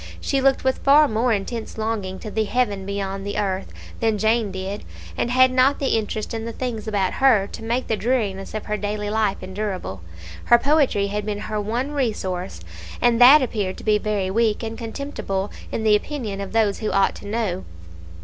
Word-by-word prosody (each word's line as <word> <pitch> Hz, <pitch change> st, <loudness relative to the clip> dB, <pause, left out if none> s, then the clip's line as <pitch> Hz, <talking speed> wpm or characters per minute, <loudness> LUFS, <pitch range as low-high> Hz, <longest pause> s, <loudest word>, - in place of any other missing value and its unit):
She 275 Hz, -1 st, 0 dB
looked 270 Hz, 0 st, +3 dB
with 260 Hz, 0 st, +1 dB
far 295 Hz, +2 st, +6 dB
more 235 Hz, +1 st, +1 dB
intense 220 Hz, +3 st, -3 dB
longing 215 Hz, -4 st, -2 dB
to 215 Hz, -, -6 dB
the 220 Hz, +1 st, 0 dB
Heaven 205 Hz, -4 st, -1 dB
beyond 195 Hz, -1 st, -3 dB
the 205 Hz, 0 st, -4 dB
earth 195 Hz, -2 st, -2 dB, 0.3 s
than 225 Hz, -2 st, +1 dB
Jane 220 Hz, 0 st, +1 dB
did, 190 Hz, +2 st, -5 dB, 0.3 s
and -, -, -1 dB
had 255 Hz, +1 st, +5 dB
not 260 Hz, +2 st, +4 dB
the 275 Hz, -, +1 dB
interest 215 Hz, 0 st, -3 dB
in 225 Hz, -1 st, -3 dB
the 230 Hz, -, -4 dB
things 230 Hz, -3 st, -4 dB
about 200 Hz, -3 st, 0 dB
her 230 Hz, -8 st, +5 dB
to -, -, -8 dB
make 235 Hz, +3 st, -1 dB
the 220 Hz, -, 0 dB
dreariness 215 Hz, -5 st, -1 dB
of 215 Hz, -, -4 dB
her 210 Hz, 0 st, -2 dB
daily 205 Hz, 0 st, -3 dB
life 215 Hz, -3 st, 0 dB
endurable. 185 Hz, -, -4 dB, 0.4 s
Her 240 Hz, -, +7 dB
poetry 275 Hz, -7 st, +2 dB
had 210 Hz, +1 st, -2 dB
been 205 Hz, 0 st, -3 dB
her 215 Hz, -1 st, -3 dB
one 240 Hz, +7 st, -2 dB
resource; 190 Hz, -, -2 dB, 0.4 s
and 240 Hz, 0 st, +3 dB
that 270 Hz, +4 st, +9 dB
appeared 205 Hz, -6 st, -2 dB
to -, -, -10 dB
be 210 Hz, -1 st, +3 dB
very 205 Hz, -3 st, -1 dB
weak 225 Hz, +1 st, +1 dB
and 225 Hz, 0 st, -4 dB
contemptible 225 Hz, -5 st, -4 dB, 0.2 s
in 220 Hz, -, -2 dB
the 215 Hz, -1 st, +5 dB
opinion 210 Hz, -4 st, -3 dB
of 195 Hz, -, -6 dB
those 220 Hz, -3 st, +1 dB
who 215 Hz, -, -2 dB
ought 195 Hz, 0 st, +2 dB
to -, -, -10 dB
know. 205 Hz, -4 st, -2 dB
215 Hz, 195 wpm, -22 LUFS, 200-240 Hz, 0.4 s, that